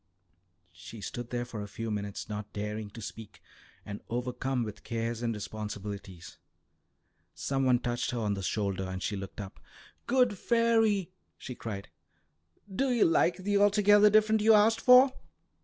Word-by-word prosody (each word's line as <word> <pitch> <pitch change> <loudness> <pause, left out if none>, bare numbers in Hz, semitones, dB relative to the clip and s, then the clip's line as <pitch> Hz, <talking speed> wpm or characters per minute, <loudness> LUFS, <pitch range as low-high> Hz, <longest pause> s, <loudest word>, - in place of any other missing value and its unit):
She 90 +5 -11
stood 120 +4 -6
there 120 0 -2
for 115 -3 -7
a 105 - -6
few 115 +2 -5
minutes, 100 -1 -4
not 105 0 -6
daring 105 +1 -4
to 110 +2 -10
speak, 110 +1 -9 0.5
and 105 0 -7
overcome 125 +1 -2
with 105 -2 -8
cares 115 0 -3
and 120 -1 0
responsibilities. 100 -3 -7 1.0
Some 135 -1 -1
one 125 -1 +4
touched 120 0 -2
her 125 - -3
on 105 -3 0
the 100 - -4
shoulder, 100 -1 -2
and 95 0 -5
she 105 - -2
looked 95 +1 -7
up. 100 -2 -8 0.5
"Good 245 -6 +2
fairy!" 225 -5 +2 0.3
she 125 - -7
cried. 105 -5 -7 0.9
"Do 270 +4 +1
you 240 -3 +4
like 170 +2 +2
the 205 +1 +2
altogether 205 0 +5
different 215 +1 +3
you 220 +1 +6
asked 225 +2 +4
for?" 255 +1 +7
120 Hz, 155 wpm, -29 LUFS, -, 1.0 s, for